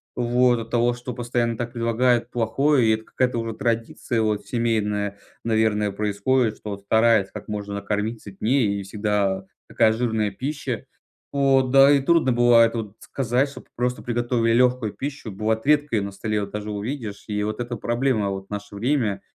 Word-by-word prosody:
вот 120 0 +2
от 115 0 -7
того, 120 0 +2
что 120 +1 -7
постоянно 120 -1 -1
так 120 0 -4
предлагают 120 0 +1
плохое. 125 +3 +2
И - - +4
это 110 0 -3
какая-то 125 -2 -1
уже 115 0 -3
традиция 115 0 -1
вот 105 -1 -1
семейная, 105 -4 -1 0.3
наверное, 110 -2 +1
происходит, 105 +3 0
что 105 - -7
вот 100 0 -6
стараются 110 -1 +3
как - - -8
можно 105 -1 -5
накормить 105 +3 -2
сытнее, 105 +1 0
и - - -5
всегда 100 -1 -1 0.2
такая 110 -1 +3
жирная 110 -3 0
пища. 135 -2 -4 0.5
Вот, 135 -2 +3
да 135 +1 +7
и 145 - +5
трудно 160 -2 +3
бывает 120 -1 +5
вот 110 -3 -5
сказать, 130 +1 0
чтоб 140 - -12
просто 125 +1 -1
приготовили 120 -1 0
легкую 125 -2 +2
пищу. 140 -5 -6
Бывает, 110 +3 -1
редко 145 -4 +3
ее - - +1
на 100 0 -4
столе 105 +2 -2
вот 100 -1 -4
даже 105 0 -5
увидишь. 105 0 -5
И 105 -1 -2
вот 110 +2 -3
эта 120 0 -3
проблема 120 -2 0
вот 95 0 -5
в - - -48
наше 105 0 -6
время 110 -3 0
115 Hz, 175 wpm, -23 LUFS, 105-125 Hz, 0.5 s, да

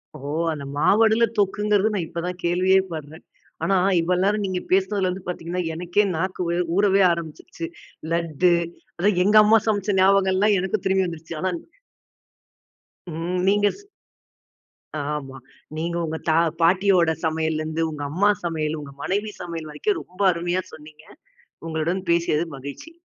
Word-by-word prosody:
ஓ! - - -9 0.3
அந்த 145 -3 -5
மாவடுல 220 +7 +4
தொக்குங்குறது 210 +1 +2
நான் 180 -5 -1
இப்ப 170 - -5
தான் 180 0 -4
கேள்வியே 185 +2 +3
படுறேன். 155 +1 -8 0.4
ஆனா 195 - +2 0.3
இவ்வள் 180 +2 +1
நேரம் 205 +1 +1
நீங்கப் 185 -1 -3
பேசுனதுல 190 0 +2
இருந்து 180 +1 -4
பார்த்தீங்கன்னா 180 0 -3
எனக்கே 175 +5 +1
நாக்கு 185 +2 -2
வே 170 - 0 0.2
ஊறவே 200 0 +4
ஆரம்பிச்சுடுச்சு. 170 - -5 0.5
லட்டு. 170 +1 +2 0.4
அதான் 190 +1 +2
எங்க 210 +2 +5
அம்மா 220 +2 +6
சமைச்ச 205 -1 +1
ஞாபகம் 190 0 +4
எல்லாம் 205 +1 +3
எனக்கும் 190 +1 -2
திரும்பி 190 0 +2
வந்துருச்சு. 165 0 -7
ஆனா 185 - +1 1.6
ம். 170 +3 -3
நீங்க 205 +1 +4
ஸ் 410 - -17 1.3
ஆம்மா. 135 -2 -7 0.4
நீங்க 170 +1 -2
உங்க 160 0 -3
தா 155 - +4 0.3
பாட்டியோட 180 0 +4
சமையல 160 -1 0
இருந்து 160 +1 -3
உங்க 145 -1 -6
அம்மா 200 +6 +3
சமையல் 160 -2 -2
உங்க 140 -1 -9
மனைவி 205 +3 -1
சமையல் 165 -3 -6
வரைக்கும் 405 - -1
ரொம்ப 185 +3 -11
அருமையா 175 +2 -1
சொன்னீங்க. 155 0 -13 0.6
உங்களுடன் 165 +3 -1
பேசியதில் 170 -1 +1
மகிழ்ச்சி. 140 - -9
180 Hz, 145 wpm, -23 LUFS, 160-195 Hz, 1.6 s, அம்மா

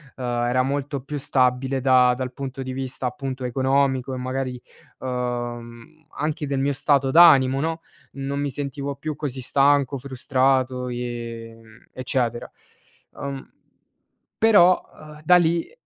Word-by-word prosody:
ehm, 130 - -8
era 120 +1 0
molto 140 +1 -2
più 145 +3 -6
stabile 130 -1 +1
da 125 -1 +5
dal 130 0 -4
punto 135 0 -6
di 130 -1 -5
vista, 130 -1 -4
appunto, 130 +1 -5
economico 130 +1 0
e, - - -4
magari, 130 0 -4 0.4
ehm, 120 -2 -4 0.3
anche 150 0 -2
del 140 -1 -2
mio 140 +1 +1
stato 140 0 +2
d'animo, 135 -4 +6
no? 160 +2 -2 0.3
Non 140 +1 -4
mi 145 -1 -2
sentivo 140 0 -4
più 150 +2 -5
così 135 -4 -5
stanco, 140 +1 +2
frustrato 130 -1 0
e, 120 -2 -6
mhmm, 115 0 -19
eccetera. 120 -2 -1 0.7
Ehm, 140 -1 -6 0.9
però, 200 -5 +5
ehm, 150 0 -13
da 180 +3 +6
lì, 170 -1 +2
130 Hz, 135 wpm, -23 LUFS, 125-140 Hz, 0.9 s, d'animo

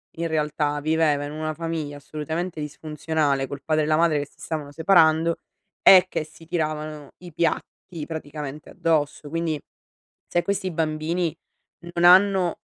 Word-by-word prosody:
in 165 +1 -2
realtà 150 -2 0
viveva 155 -1 +2
in 145 - -6
una 155 0 -3
famiglia 160 -3 -4
assolutamente 160 +4 -4
disfunzionale, 150 -2 -1
col 140 0 -7
padre 155 -1 +1
e - - -1
la 155 0 +3
madre 165 -2 +3
che 145 - -3
si - - -28
stavano 150 -3 -5
separando 165 0 +4 0.4
e 185 -1 +8
che - - -2
si 160 +1 -16
tiravano 155 -3 -3
i 175 -2 -12
piatti 165 0 -3
praticamente 150 -2 -7
addosso; 150 -2 0
quindi 165 -1 -1 0.7
se 175 - +1
questi 195 -2 -1
bambini 160 +1 -1 0.6
non 170 - +1
hanno 185 -1 +5
155 Hz, 145 wpm, -24 LUFS, 150-165 Hz, 0.7 s, e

